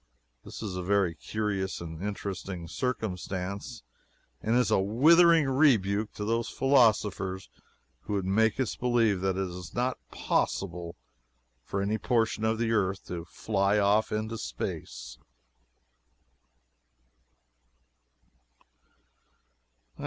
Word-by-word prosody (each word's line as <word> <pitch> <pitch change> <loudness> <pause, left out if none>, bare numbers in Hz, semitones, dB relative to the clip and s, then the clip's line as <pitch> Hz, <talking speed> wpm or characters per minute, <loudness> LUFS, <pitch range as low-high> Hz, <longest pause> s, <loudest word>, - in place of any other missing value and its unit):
This - - -9
is 100 -4 -4
a 90 - -3
very 95 -2 +1
curious 100 -1 -3
and 80 -1 -7
interesting 95 -3 -5
circumstance, 100 - -4 0.6
and 115 +2 +1
is 125 0 +2
a - - +4
withering 160 - +5
rebuke 110 -7 +3
to 105 - -5
those 115 +1 0
philosophers 105 -8 +2 0.5
who 105 - -6
would 100 -2 -1
make 110 +4 +2
us 130 -5 -1
believe 115 -6 +1
that 95 -1 0
it 95 -1 -1
is 90 0 -9
not 125 +2 -1
possible 85 -2 -2 0.7
for 100 +10 -2
any 105 +2 -1
portion 115 -3 0
of 110 0 +1
the 115 0 0
earth 95 -3 0
to 85 -2 -5
fly 100 +2 0
off 105 +1 +2
into 110 +1 -3
space. - - -6
105 Hz, 110 wpm, -28 LUFS, 95-115 Hz, 0.7 s, withering